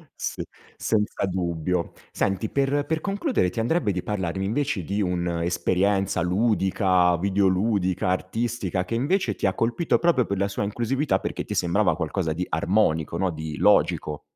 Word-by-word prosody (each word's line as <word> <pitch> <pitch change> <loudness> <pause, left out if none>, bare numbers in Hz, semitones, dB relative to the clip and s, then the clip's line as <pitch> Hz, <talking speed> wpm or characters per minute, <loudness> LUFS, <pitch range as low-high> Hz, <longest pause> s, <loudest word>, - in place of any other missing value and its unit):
Sì. - - -4 0.3
Senza 105 -2 0
dubbio. 90 -2 -2 0.2
Senti, 95 +2 -1
per 140 +1 +1
per 160 +1 -1
concludere 200 - 0
ti 115 - -5
andrebbe 115 -1 +1
di 90 -1 -2
parlarmi 95 -2 -2
invece 115 -2 -1
di 100 +6 -2
un'esperienza 90 +2 0
ludica, 95 -2 +2
videoludica, 95 0 +1
artistica 95 0 -1
che 115 - -3
invece 135 - 0
ti - - -3
ha 95 - +2
colpito 120 - +1
proprio 165 -8 +3
per 100 - -2
la 100 +1 +1
sua 100 +1 -3
inclusività 120 +8 0
perché - - -4
ti - - -5
sembrava 90 0 +2
qualcosa 80 +1 -2
di 90 +3 -3
armonico 80 -1 +1
no, 95 +1 +1
di 80 -1 -6
logico. 75 -1 +2
95 Hz, 150 wpm, -25 LUFS, 90-115 Hz, 0.3 s, proprio